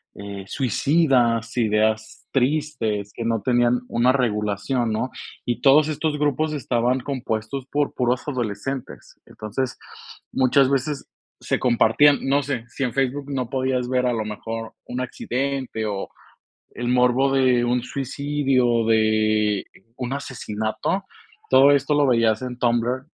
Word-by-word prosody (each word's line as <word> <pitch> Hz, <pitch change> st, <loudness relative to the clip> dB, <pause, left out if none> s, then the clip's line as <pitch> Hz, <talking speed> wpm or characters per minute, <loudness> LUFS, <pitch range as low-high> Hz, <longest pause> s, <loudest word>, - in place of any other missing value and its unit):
eh, 100 Hz, -1 st, -7 dB
suicidas, 125 Hz, -, +1 dB
ideas 110 Hz, -1 st, 0 dB
tristes, 125 Hz, -7 st, 0 dB
que 115 Hz, -, -5 dB
no 115 Hz, -2 st, 0 dB
tenían 120 Hz, 0 st, +2 dB
una 120 Hz, +2 st, +3 dB
regulación, 115 Hz, -1 st, 0 dB
¿no? 110 Hz, +4 st, -1 dB, 0.4 s
Y 120 Hz, 0 st, -2 dB
todos 145 Hz, +3 st, +6 dB
estos 155 Hz, 0 st, -1 dB
grupos 150 Hz, +1 st, 0 dB
estaban 125 Hz, -2 st, 0 dB
compuestos 125 Hz, -1 st, -4 dB
por 145 Hz, 0 st, 0 dB
puros 125 Hz, +1 st, -1 dB
adolescentes. 125 Hz, 0 st, -5 dB
Entonces, 120 Hz, +5 st, -4 dB, 0.5 s
muchas 130 Hz, +1 st, +3 dB
veces 140 Hz, +1 st, -1 dB, 0.3 s
se -, -, -1 dB
compartían, 125 Hz, +4 st, +4 dB
no 140 Hz, +1 st, +1 dB
sé, 125 Hz, -4 st, -3 dB
si 120 Hz, +4 st, -5 dB
en 125 Hz, -, -1 dB
Facebook 135 Hz, +1 st, -1 dB
no 130 Hz, -3 st, -2 dB
podías 130 Hz, -2 st, -1 dB
ver 125 Hz, -1 st, +1 dB
a 125 Hz, -, +1 dB
lo 110 Hz, -2 st, -2 dB
mejor 110 Hz, +1 st, -6 dB
un 125 Hz, +1 st, -4 dB
accidente 130 Hz, -2 st, -3 dB
o 100 Hz, -2 st, -3 dB, 0.7 s
el 120 Hz, 0 st, -3 dB
morbo 125 Hz, +2 st, +3 dB
de 130 Hz, -3 st, +3 dB
un 120 Hz, 0 st, +1 dB
suicidio, 135 Hz, -3 st, 0 dB
de, 110 Hz, -2 st, +2 dB
eh, -, -, -11 dB, 0.3 s
un 125 Hz, 0 st, -4 dB
asesinato. 125 Hz, -, -3 dB, 0.5 s
Todo 135 Hz, +2 st, +7 dB
esto 140 Hz, +1 st, +2 dB
lo 145 Hz, -1 st, +3 dB
veías 115 Hz, -3 st, +2 dB
en 125 Hz, -1 st, -5 dB
Tumblr, 120 Hz, +2 st, 0 dB
125 Hz, 135 wpm, -23 LUFS, 115-135 Hz, 0.7 s, Todo